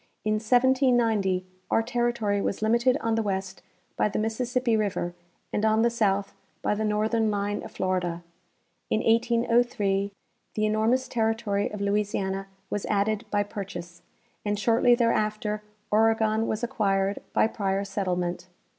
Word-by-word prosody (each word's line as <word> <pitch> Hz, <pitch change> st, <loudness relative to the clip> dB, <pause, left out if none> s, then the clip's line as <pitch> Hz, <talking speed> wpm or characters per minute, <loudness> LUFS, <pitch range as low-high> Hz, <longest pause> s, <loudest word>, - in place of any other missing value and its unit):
In 215 Hz, 0 st, +1 dB
1790 235 Hz, -6 st, +3 dB, 0.2 s
our 225 Hz, -, +2 dB
terri 240 Hz, 0 st, 0 dB
tory 205 Hz, -3 st, 0 dB
was 200 Hz, -, -2 dB
limited 235 Hz, +4 st, +3 dB
on 230 Hz, -, 0 dB
the 225 Hz, -, +2 dB
west 190 Hz, -2 st, -3 dB, 0.3 s
by -, -, +2 dB
the -, -, -3 dB
Mississippi 235 Hz, +2 st, 0 dB
river 200 Hz, -5 st, -1 dB, 0.4 s
and 210 Hz, -, 0 dB
on 220 Hz, +1 st, +3 dB
the 235 Hz, -, +3 dB
south 200 Hz, -4 st, 0 dB, 0.3 s
by -, -, +2 dB
the 215 Hz, +1 st, -2 dB
northern 215 Hz, +1 st, +1 dB
line 205 Hz, 0 st, -1 dB
of -, -, -10 dB
Florida. 180 Hz, -2 st, -1 dB, 0.7 s
In 215 Hz, -, +1 dB
1803 230 Hz, -4 st, +2 dB, 0.4 s
the 215 Hz, -, +1 dB
enormous 220 Hz, +5 st, +1 dB
territory 225 Hz, -3 st, 0 dB
of 210 Hz, -, -6 dB
Louisiana 200 Hz, -1 st, -1 dB, 0.2 s
was 205 Hz, -, -2 dB
added 210 Hz, +2 st, 0 dB
by 205 Hz, -1 st, +1 dB
jDurchase, 175 Hz, -4 st, -7 dB, 0.4 s
and 205 Hz, 0 st, -1 dB
shortly 230 Hz, +3 st, +4 dB
there 235 Hz, -1 st, +2 dB
after 210 Hz, 0 st, -1 dB, 0.3 s
Oregon 220 Hz, 0 st, +3 dB
was 220 Hz, +2 st, -2 dB
acquired 195 Hz, -4 st, 0 dB
by -, -, +4 dB
prior 195 Hz, -3 st, -1 dB
settlement. 180 Hz, -3 st, -2 dB
215 Hz, 145 wpm, -26 LUFS, 200-230 Hz, 0.7 s, shortly